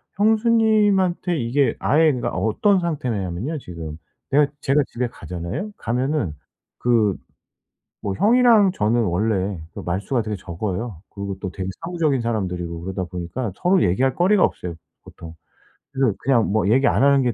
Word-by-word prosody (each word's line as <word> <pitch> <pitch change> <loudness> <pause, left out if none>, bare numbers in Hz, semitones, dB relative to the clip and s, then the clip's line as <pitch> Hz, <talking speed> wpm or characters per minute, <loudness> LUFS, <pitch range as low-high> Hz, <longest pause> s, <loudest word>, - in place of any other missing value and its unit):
형수님한테 210 -5 +2
이게 125 +4 +1
아예 155 +3 +3
그러니까 120 -3 -2
어떤 190 - +2
상태냐하면요 125 - -3
지금. 80 - -8 0.3
내가 145 +1 +4
제가 140 +2 +3
집에 125 +1 -2
가잖아요. 90 - -6
가면은 125 - -1 0.5
그 110 -5 +2 0.9
뭐 100 - -2
형이랑 225 - +5
저는 115 - +1
원래 95 -1 0
그 - - -6
말수가 100 +8 -1
되게 105 -1 -4
적어요. 95 +2 -5
그리고 100 -1 -5
또 95 - -4
되게 95 +1 -5
사무적인 165 -6 0
사람들이고 90 -7 -3
그러다 95 +1 -4
보니까 90 +6 -4
서로 180 +1 +2
얘기할 130 +9 +2
거리가 185 +2 +4
없어요 85 -2 -2 0.3
보통. 85 -1 -11 0.6
그래서 135 -6 +1
그냥 125 -4 +2
뭐 105 -1 +1
얘기 135 +5 +4
안 115 - +2
하는 140 -1 +5
게 120 -2 +1
120 Hz, 345 characters per minute, -22 LUFS, 95-155 Hz, 0.9 s, 형이랑